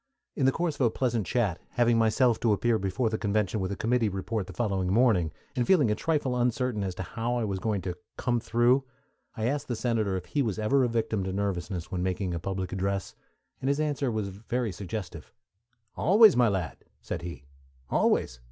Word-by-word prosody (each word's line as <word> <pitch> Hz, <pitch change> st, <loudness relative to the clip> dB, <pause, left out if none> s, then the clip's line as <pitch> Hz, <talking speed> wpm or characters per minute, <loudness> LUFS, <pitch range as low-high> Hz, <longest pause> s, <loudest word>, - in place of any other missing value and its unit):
In 135 Hz, -, +2 dB
the -, -, +5 dB
course 170 Hz, +2 st, -1 dB
of -, -, -2 dB
a 120 Hz, -, +5 dB
pleasant 120 Hz, -4 st, -1 dB
chat, 105 Hz, -9 st, 0 dB
having 120 Hz, -1 st, +3 dB
myself 115 Hz, +1 st, +3 dB
to 115 Hz, -2 st, +3 dB
appear 110 Hz, +3 st, +1 dB
before 105 Hz, +4 st, -1 dB
the 110 Hz, -, -2 dB
convention 105 Hz, 0 st, 0 dB
with 95 Hz, 0 st, -2 dB
a -, -, -2 dB
committee 115 Hz, +1 st, +1 dB
report 95 Hz, +1 st, -3 dB
the -, -, -8 dB
following 95 Hz, -5 st, -1 dB
morning, 100 Hz, -8 st, +3 dB, 0.2 s
and 125 Hz, -2 st, 0 dB
feeling 150 Hz, -, +4 dB
a -, -, +3 dB
trifle 145 Hz, 0 st, 0 dB
uncertain 125 Hz, -2 st, 0 dB
as 95 Hz, -2 st, -3 dB
to 95 Hz, -, -4 dB
how 115 Hz, +5 st, -3 dB
I 120 Hz, -, 0 dB
was 100 Hz, -3 st, -2 dB
going 105 Hz, -2 st, -1 dB
to 90 Hz, -1 st, -3 dB, 0.2 s
"come 120 Hz, -2 st, 0 dB
through," 120 Hz, +4 st, +3 dB, 0.5 s
I 110 Hz, -, -1 dB
asked 140 Hz, +4 st, -1 dB
the 120 Hz, -, -2 dB
senator 110 Hz, -5 st, 0 dB
if 90 Hz, -, -6 dB
he 145 Hz, -, -1 dB
was 110 Hz, -7 st, -1 dB
ever 130 Hz, +5 st, +2 dB
a -, -, +3 dB
victim 115 Hz, -3 st, -1 dB
to 95 Hz, -, -2 dB
nervousness 95 Hz, -3 st, -3 dB
when 90 Hz, -, -2 dB
making 95 Hz, 0 st, -1 dB
a 85 Hz, -, -2 dB
public 95 Hz, +1 st, -4 dB
address, 95 Hz, 0 st, -2 dB, 0.5 s
and 135 Hz, -, -2 dB
his 140 Hz, +1 st, +1 dB
answer 145 Hz, -3 st, 0 dB
was 110 Hz, -3 st, -2 dB
very 115 Hz, +4 st, -3 dB
suggestive. 95 Hz, 0 st, -6 dB, 0.6 s
"Always, 210 Hz, +4 st, +6 dB
my 120 Hz, -1 st, +5 dB
lad," 95 Hz, -5 st, -2 dB, 0.2 s
said -, -, -5 dB
he, 85 Hz, -4 st, -7 dB, 0.5 s
"always! 65 Hz, -, +1 dB
110 Hz, 205 wpm, -28 LUFS, 95-125 Hz, 0.6 s, Always